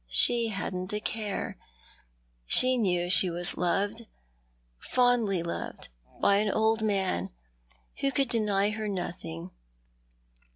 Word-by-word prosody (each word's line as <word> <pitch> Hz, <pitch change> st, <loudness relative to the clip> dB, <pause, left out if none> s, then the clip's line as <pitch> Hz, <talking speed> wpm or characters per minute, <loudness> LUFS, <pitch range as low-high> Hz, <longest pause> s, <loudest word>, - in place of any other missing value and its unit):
She 230 Hz, -, +4 dB
hadn't 190 Hz, -2 st, -5 dB
a 210 Hz, -, -1 dB
care. 210 Hz, -1 st, -4 dB, 0.9 s
She 255 Hz, 0 st, +7 dB
knew 185 Hz, -7 st, +1 dB
that 175 Hz, -, -3 dB
slie 185 Hz, -1 st, +6 dB
was 175 Hz, +1 st, -3 dB
loved, 205 Hz, +5 st, -2 dB, 0.7 s
fondly 240 Hz, -8 st, +1 dB
loved, 170 Hz, -, -6 dB, 0.3 s
by 200 Hz, -, +3 dB
an 210 Hz, +1 st, +1 dB
old 220 Hz, +2 st, +1 dB
man, 190 Hz, -, -1 dB, 0.7 s
who 275 Hz, -, 0 dB
could 275 Hz, -2 st, 0 dB
deny 210 Hz, -3 st, +1 dB
her 215 Hz, 0 st, -4 dB
nothing. 170 Hz, -, -6 dB
205 Hz, 120 wpm, -28 LUFS, 180-225 Hz, 0.9 s, She